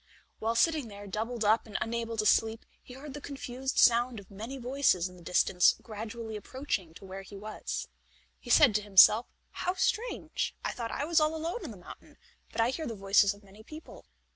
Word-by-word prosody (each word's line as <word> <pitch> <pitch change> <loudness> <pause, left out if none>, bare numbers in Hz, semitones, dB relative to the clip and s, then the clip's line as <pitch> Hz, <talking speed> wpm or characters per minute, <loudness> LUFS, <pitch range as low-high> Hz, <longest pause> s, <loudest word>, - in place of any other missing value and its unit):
While 225 +1 -1
sitting 305 +1 +2
there 205 -1 -10
doubled 220 +3 -3
up 220 +2 +3
and 210 - -4
unable 230 0 -3
to 215 - 0
sleep, 220 +2 +2 0.2
he 250 - -12
heard 275 +1 -9
the 295 - -8
confused 265 -1 -5
sound 240 -1 +4
of 200 0 -16
many 225 +7 -7
voices 250 -8 +1
in 180 - -13
the 180 - -15
distance 180 +1 +3
gradually 220 +1 -7
approaching 210 - -4
to 195 - -12
where 190 +1 -7
he 195 +1 -11
was. 215 +2 -5 0.5
He - - -12
said 285 -8 +6
to 210 - +1
himself: 210 +3 +6 0.2
"How 360 +1 -2
strange! 445 +5 -1
I - - 0
thought 230 -2 -5
I 280 - -3
was 330 +1 +3
all 310 +1 +1
alone 330 +8 -4
in - - -6
the - - -10
mountain, - - -14 0.3
but - - -7
I 230 +2 +2
hear 315 +3 -4
the 230 - -5
voices 195 0 +3
of 205 - -20
many 200 +2 -16
people." 310 +8 -12
230 Hz, 205 wpm, -30 LUFS, 205-265 Hz, 0.5 s, said